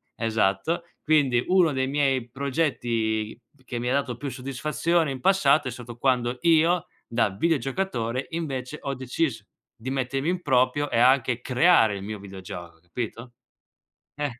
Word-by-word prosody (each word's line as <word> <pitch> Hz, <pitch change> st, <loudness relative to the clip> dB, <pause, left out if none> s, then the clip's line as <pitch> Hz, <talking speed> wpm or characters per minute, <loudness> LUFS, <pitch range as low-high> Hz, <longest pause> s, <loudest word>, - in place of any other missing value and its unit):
esatto. 115 Hz, -, 0 dB, 0.2 s
Quindi, 140 Hz, -6 st, +3 dB
uno 180 Hz, -4 st, +4 dB
dei 130 Hz, 0 st, 0 dB
miei 135 Hz, -4 st, 0 dB
progetti 120 Hz, -6 st, -1 dB, 0.3 s
che 120 Hz, -1 st, -4 dB
mi 125 Hz, +1 st, -2 dB
ha -, -, +1 dB
dato 140 Hz, -4 st, 0 dB
più 140 Hz, +1 st, -4 dB
soddisfazione 150 Hz, +5 st, -1 dB
in 130 Hz, -2 st, -6 dB
passato 155 Hz, -8 st, +4 dB
è -, -, -5 dB
stato 120 Hz, -1 st, -9 dB
quando 125 Hz, -1 st, +1 dB
io, 170 Hz, +1 st, +4 dB, 0.2 s
da 115 Hz, -2 st, +1 dB
videogiocatore, 135 Hz, -, -1 dB
invece 150 Hz, -4 st, -4 dB
ho 140 Hz, -, -3 dB
deciso 130 Hz, -3 st, -2 dB, 0.3 s
di 120 Hz, +4 st, -7 dB
mettermi 135 Hz, +3 st, -1 dB
in 180 Hz, 0 st, -1 dB
proprio 130 Hz, +1 st, +2 dB
e 115 Hz, -, +2 dB
anche 125 Hz, -1 st, +3 dB
creare 125 Hz, -, +4 dB
il 95 Hz, -, -7 dB
mio 105 Hz, 0 st, -5 dB
videogioco, 90 Hz, -4 st, -9 dB
capito? 115 Hz, +6 st, -6 dB, 0.8 s
Eh, 145 Hz, -5 st, -4 dB
130 Hz, 145 wpm, -25 LUFS, 115-150 Hz, 0.8 s, uno